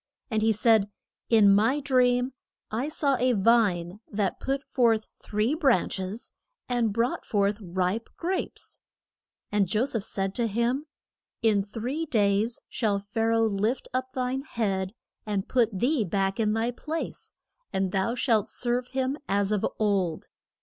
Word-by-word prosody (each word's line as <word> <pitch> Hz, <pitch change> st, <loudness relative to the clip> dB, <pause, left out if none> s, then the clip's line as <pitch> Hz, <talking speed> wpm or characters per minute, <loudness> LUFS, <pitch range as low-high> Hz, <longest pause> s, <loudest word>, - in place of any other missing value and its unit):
And 220 Hz, -1 st, +1 dB
he 220 Hz, +1 st, +4 dB
said, 215 Hz, -1 st, +4 dB, 0.4 s
In 210 Hz, -4 st, +6 dB
my 225 Hz, +8 st, +3 dB
dream 250 Hz, -2 st, +2 dB, 0.4 s
I 245 Hz, +7 st, -1 dB
saw 280 Hz, -3 st, +1 dB
a 250 Hz, +1 st, +2 dB
vine, 200 Hz, -4 st, +2 dB
that 205 Hz, -2 st, -1 dB
put 275 Hz, +1 st, -2 dB
forth 230 Hz, -6 st, +2 dB, 0.2 s
three 215 Hz, +6 st, 0 dB
branch 270 Hz, -, +2 dB
es 190 Hz, +5 st, -5 dB, 0.3 s
and 240 Hz, -3 st, +1 dB
brought 230 Hz, +4 st, 0 dB
forth 205 Hz, 0 st, +1 dB
ripe 185 Hz, +4 st, -1 dB
grapes. 365 Hz, +2 st, -3 dB, 0.7 s
And 205 Hz, -2 st, +2 dB
Jo 215 Hz, +7 st, +1 dB
seph 230 Hz, -5 st, -1 dB
said 195 Hz, -1 st, -2 dB
to 235 Hz, +1 st, 0 dB
him, 235 Hz, +7 st, 0 dB, 0.6 s
In 215 Hz, -3 st, +4 dB
three 245 Hz, +10 st, -4 dB
days 215 Hz, -2 st, +1 dB
shall 215 Hz, -5 st, 0 dB
Pha 205 Hz, +3 st, -4 dB
ra 230 Hz, 0 st, +3 dB
oh 225 Hz, -, +3 dB
lift 215 Hz, +4 st, -1 dB
up 255 Hz, 0 st, -2 dB
thine 255 Hz, +1 st, -1 dB
head, 200 Hz, -7 st, -2 dB, 0.3 s
and 200 Hz, -2 st, -1 dB
put 240 Hz, -4 st, +3 dB
thee 245 Hz, +6 st, +1 dB
back 195 Hz, +2 st, -1 dB
in 215 Hz, -1 st, +2 dB
thy 225 Hz, +2 st, 0 dB
place, 315 Hz, +6 st, -5 dB, 0.4 s
and 190 Hz, -1 st, 0 dB
thou 195 Hz, +5 st, 0 dB
shalt 230 Hz, -5 st, +2 dB
serve 245 Hz, 0 st, -1 dB
him 265 Hz, +3 st, -2 dB
as 200 Hz, 0 st, +1 dB
of 210 Hz, -2 st, 0 dB
old. 195 Hz, -6 st, 0 dB
225 Hz, 155 wpm, -27 LUFS, 200-250 Hz, 0.7 s, In